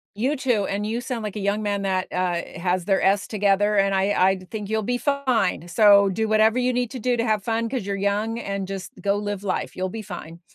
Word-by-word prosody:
You 260 +8 0
too, 245 -7 0
and 200 +1 -2
you 225 +3 -2
sound, 245 -2 -4
like 210 -1 -5
a 210 - -3
young 200 +2 0
man 205 -1 -1
that, 190 -1 0
uh, 180 -2 0 0.2
has 180 0 0
their 195 -1 +2
s 195 0 +2
together, 205 0 +2
and 195 0 +3
I 190 - +2 0.3
I - - -3
think 210 -3 -5
you'll 220 0 0
be 245 +4 -1
fine, 255 - 0
so 200 0 +6
do 220 +3 -1
whatever 220 +2 +3
you 250 0 +1
need 245 -2 -1
to 260 - -6
do 245 +2 0
to 230 - 0
have 215 -3 +1
fun 230 +1 -1
'cause 245 -5 -3
you're 200 -1 -2
young 205 +3 -1
and 200 -4 -4
just 195 -1 -6
go 200 0 +1
live 205 -1 -3
life, 190 -2 -2
you'll 185 0 -2
be 220 +4 -6
fine. 175 -4 -9
205 Hz, 245 wpm, -23 LUFS, 195-225 Hz, 0.3 s, so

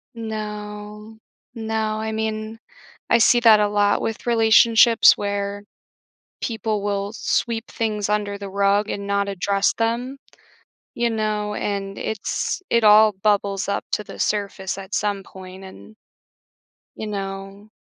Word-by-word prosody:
No, 210 -1 -7 0.4
no, 220 -1 -2
I 220 0 -3
mean, 220 0 -4 0.5
I - - +5
see 240 +1 +5
that 220 -3 +7
a 210 - +3
lot 205 0 +2
with 225 - -4
relationships 230 0 +6
where 200 0 -3 0.8
people 220 -2 -2
will 200 0 -2
sweep 230 0 -1
things 210 -3 -2
under 205 -1 -1
the 200 0 -7
rug 200 +2 +1
and 200 -1 -4
not 200 0 0
address 200 +1 +1
them, 240 +4 -2 0.8
you 235 0 0
know, 215 -1 -2
and 200 -1 -3
it's 220 - -3
it 235 - +2
all 215 0 +7
bubbles 200 0 0
up 200 - -1
to 210 - 0
the - - -11
surface 200 -2 -2
at 195 +1 -8
some 205 -1 -1
point 190 0 -12
and 190 +3 -13 1.0
you 220 - -5
know 195 0 -6
210 Hz, 135 wpm, -22 LUFS, 200-220 Hz, 1.0 s, that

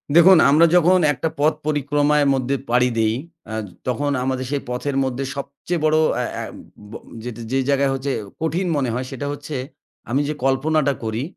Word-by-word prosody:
দেখুন 175 +1 +8
আমরা 155 +4 +6
যখন 180 +2 +5
একটা 160 +4 -2
পথ 155 +2 +3
পরিক্রমার 145 0 +2
মধ্যে 135 +1 0
পাড়ি 125 +1 +3
দেই 110 0 +2 0.4
আ - - -4 0.3
তখন 145 +3 0
আমাদের 130 0 -2
সেই 145 - -1
পথের 135 +3 -2
মধ্যে 130 +1 -2
সবচেয়ে 140 +5 -4
বড় 155 0 +3 0.2
আ - - 0 0.2
আ - - -4 0.5
ব - - -11 0.6
যে 135 - +2
জায়গায় 140 -1 +2
হচ্ছে 135 +1 -2 0.3
কঠিন 175 +3 -1
মনে 130 -4 0
হয় 130 +2 -2
সেটা 140 +2 -4
হচ্ছে 145 +1 -7 0.5
আমি 135 +4 +1
যে 150 - -1
কল্পনাটা 140 +2 +2
করি 110 +3 -2
140 Hz, 170 wpm, -21 LUFS, 130-155 Hz, 0.6 s, দেখুন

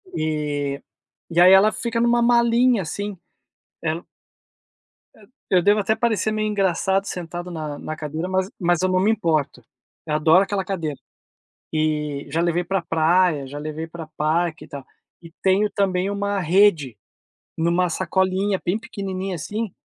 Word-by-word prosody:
E 150 -3 -2 0.5
e 170 - +2
aí 180 +1 +8
ela 200 +3 +6
fica 230 +1 -2
numa 240 0 +3
malinha 235 -1 +3
assim, 205 +4 -5 0.7
ela 165 +2 -3 1.4
Eu 185 -2 +4
devo 205 +4 +3
até 215 +2 +1
parecer 220 -2 0
meio 215 0 -1
engraçado 195 -1 +1
sentado 175 -1 -6
na 155 -3 -5
na 155 - -6
cadeira, 155 +3 -4
mas 190 0 0
mas 175 -1 +1
eu 185 - +1
não 185 0 +2
me 205 +4 +3
importo, 155 - -1 0.4
eu 155 - -3
adoro 160 +5 +5
aquela 200 -1 -2
cadeira. 165 -7 -3 0.8
E 150 -2 -1
já 160 +4 0
levei 175 +1 0
pra 195 +2 -1
praia, 165 -2 +2
já 145 +2 -7
levei 155 +2 -5
pra 165 0 -9
parque 160 +1 0
e - - -15
tal. 140 -2 -8 0.4
E 165 -1 -13
tenho 195 +2 +3
também 190 -1 0
uma 200 0 -1
rede, 170 - +3 0.6
numa 170 +2 +1
sacolinha 190 +3 0
bem 180 +4 +1
pequenininha 190 -3 -5
assim 210 +6 -4
180 Hz, 150 wpm, -22 LUFS, 155-200 Hz, 1.4 s, aí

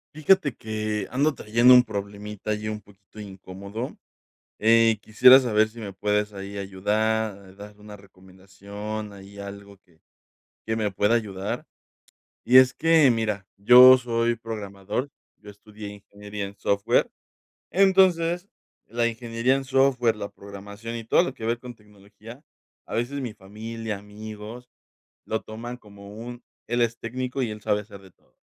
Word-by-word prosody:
Fíjate 155 -3 +3
que 110 -2 -3
ando 145 +4 +1
trayendo 120 +1 +4
un 125 - +9
problemita 105 -1 -6
ahí 105 0 -3
un 105 0 -4
poquito 100 +1 -18
incómodo, 100 +3 -8 0.6
eh, 115 0 +4
quisiera 120 +5 +7
saber 110 -4 +2
si 115 +2 -15
me 105 -3 -6
puedes 105 +2 -1
ahí 100 0 -7
ayudar, 100 0 -2
dar 105 +1 -12
una 105 0 -11
recomendación, 100 +2 -9
ahí 100 0 -13
algo 100 0 -9
que 85 -4 -31 0.7
que 110 - -1
me 105 -2 -1
pueda 105 +4 +2
ayudar, 100 -4 -3 0.8
y 125 - +5
es 130 0 +8
que 160 -3 +4
mira, 105 -4 -1
yo 125 +5 +9
soy 120 -1 0
programador, 105 +3 -5 0.3
yo 105 0 -13
estudié 105 0 -11
ingeniería 100 0 -8
en 100 +1 -12
software, 100 0 +1 0.6
entonces 185 -2 +3 0.4
la 115 +1 0
ingeniería 115 +3 0
en 135 - -4
software, 130 -4 +2
la 100 -1 -5
programación 100 +3 -9
y 115 - -7
todo 115 - +4
lo - - -3
que 110 - -7
ver 115 +1 0
con 125 0 -10
tecnología, 105 +5 -15 0.4
a - - -8
veces 130 +4 -2
mi 120 - -4
familia, 110 +2 -7
amigos 105 +3 -10 0.6
lo 110 - -2
toman 120 +3 -8
como 100 -3 -14
un: 120 +2 -9 0.2
"El 120 +1 0
es 115 0 0
técnico 125 +3 -4
y 120 -4 -1
él 105 0 -8
sabe 105 0 +1
hacer 100 -1 -13
de 95 -1 -17
todo", - - -37
110 Hz, 150 wpm, -25 LUFS, 100-120 Hz, 0.8 s, un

